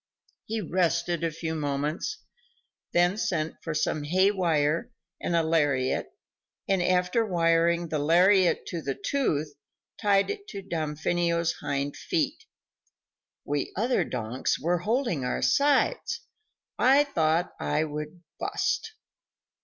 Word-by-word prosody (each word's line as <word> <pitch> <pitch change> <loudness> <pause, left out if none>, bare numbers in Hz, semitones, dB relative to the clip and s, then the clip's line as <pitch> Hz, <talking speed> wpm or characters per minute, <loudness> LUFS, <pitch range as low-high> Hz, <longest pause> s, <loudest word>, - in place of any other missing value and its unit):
He 220 0 -2
rested 170 -2 0
a 165 - +2
few 160 +1 -4
moments, 150 - -2 0.7
then 175 +3 +3
sent 165 -7 -2
for 165 -2 -4
some 155 0 0
hay 185 +6 +3
wire 165 +1 +1 0.3
and 170 - -1
a 165 - +3
lariat, 145 -5 +1 0.6
and 195 -2 +2
after 180 +5 +2
wiring 170 -2 +2
the 155 - -1
lariat 180 +5 +4
to 170 - -4
the 135 -3 -3
tooth, 155 - -1 0.5
tied 200 - +3
it 410 -1 -7
to 200 -1 -7
Damfino's 170 0 0
hind 140 0 -3
feet. - - -2 1.0
We 145 -1 -2
other 240 +5 +2
donks 115 +4 -2
were 175 +3 +1
holding 220 - 0
our 125 - -2
sides; 290 - +2 0.6
I 275 +3 +6
thought 170 - 0
I 75 - 0
would 150 +3 -6 0.2
"bust." 450 - -1
170 Hz, 120 wpm, -27 LUFS, 155-195 Hz, 1.0 s, I